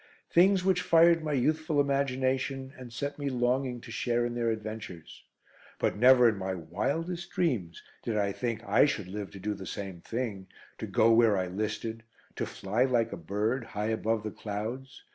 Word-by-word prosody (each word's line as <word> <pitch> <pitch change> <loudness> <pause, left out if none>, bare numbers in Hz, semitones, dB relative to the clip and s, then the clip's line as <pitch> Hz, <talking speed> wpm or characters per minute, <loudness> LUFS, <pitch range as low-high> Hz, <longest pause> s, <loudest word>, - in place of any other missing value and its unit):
Things 185 +2 +4
which 185 -2 +3
fired 170 -1 +5
my 155 -1 -1
youthful 155 +3 +1
imagination 135 -1 0
and 125 -2 -10
set 140 +5 -4
me 140 -1 -1
longing 125 0 0
to 115 - -10
share 120 0 0
in 120 - -3
their 120 -1 0
adventures. 110 -6 -6 0.5
But - - 0
never 125 +2 +7
in 110 -3 +1
my 95 0 -3
wildest 155 - -3
dreams 110 - -1 0.2
did 110 -2 -2
I 100 -1 +1
think 115 +1 -3
I - - +4
should 105 -9 -2
live 100 0 -5
to 95 - -11
do 105 +2 -2
the 95 -2 -8
same 95 -4 -6
thing, 110 -5 -4 0.3
to - - -4
go 115 +1 +4
where 115 -3 +5
I 95 - 0
listed; 110 +4 -3 0.4
to - - -2
fly 105 +6 0
like 120 -3 +1
a - - -2
bird, 105 +9 -1
high 105 -1 -3
above 110 -1 0
the 110 - -4
clouds. 115 +6 -6
120 Hz, 180 wpm, -29 LUFS, 105-135 Hz, 0.5 s, never